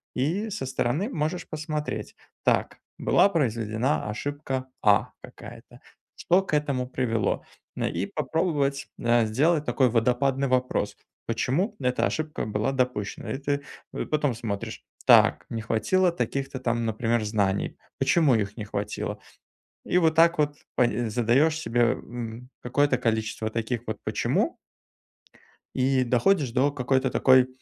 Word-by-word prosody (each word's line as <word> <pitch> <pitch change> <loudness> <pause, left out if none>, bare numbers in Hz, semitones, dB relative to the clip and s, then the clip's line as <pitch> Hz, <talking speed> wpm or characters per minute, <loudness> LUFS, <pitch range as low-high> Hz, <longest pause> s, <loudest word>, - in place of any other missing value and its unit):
и 175 - 0
со 205 -9 -4
стороны 135 - -1
можешь 160 - -2
посмотреть: 155 -1 -4 0.3
"Так, - - +1 0.2
была - - +4
произведена 115 - 0
ошибка 135 +2 -4 0.2
"А" 105 -2 +4
какая-то. 120 +2 -12 0.4
Что 185 +3 +2
к 190 - -7
этому 140 -4 0
привело?" 115 -5 -1 0.3
Э, - - 0
и 85 +3 -2
попробовать, 145 -5 -1
э, 120 -1 +3
сделать 150 +7 +2
такой 125 +1 +2
"водопадный" 125 +4 +1
вопрос: 125 0 0 0.3
"Почему 145 - 0
эта 125 0 +1
ошибка 155 -1 -2
была 105 +3 -1
допущена?" 125 -6 -2
И 135 - -3
ты, 140 0 -1 0.3
э, - - -3
потом 150 -4 0
смотришь: 110 -4 -5 0.2
"Так, - - +6
не 115 -1 -3
хватило 140 - +2
таких-то 135 -5 -3
там, 120 -2 -1
например, 115 +1 0
знаний. 100 -2 0 0.2
Почему 155 -7 +4
их 105 -1 -1
не 110 - -4
хватило?" 100 0 -4 0.7
И - - +1
вот 160 -2 +3
так 170 +1 +5
вот 145 -1 +1 0.2
пн 120 -1 +1
задаешь 125 +8 +2
себе, 120 -5 0
м, 120 +1 -7
какое-то 130 +2 +2
количество 110 -2 -1
таких 115 +1 -2
вот 110 - -3
"почему" - - 0 1.2
и 130 0 +2
доходишь 130 +3 +2
до 135 +3 +3
какой-то 130 -1 0
такой, 130 -1 +5
130 Hz, 135 wpm, -26 LUFS, 115-145 Hz, 1.2 s, Так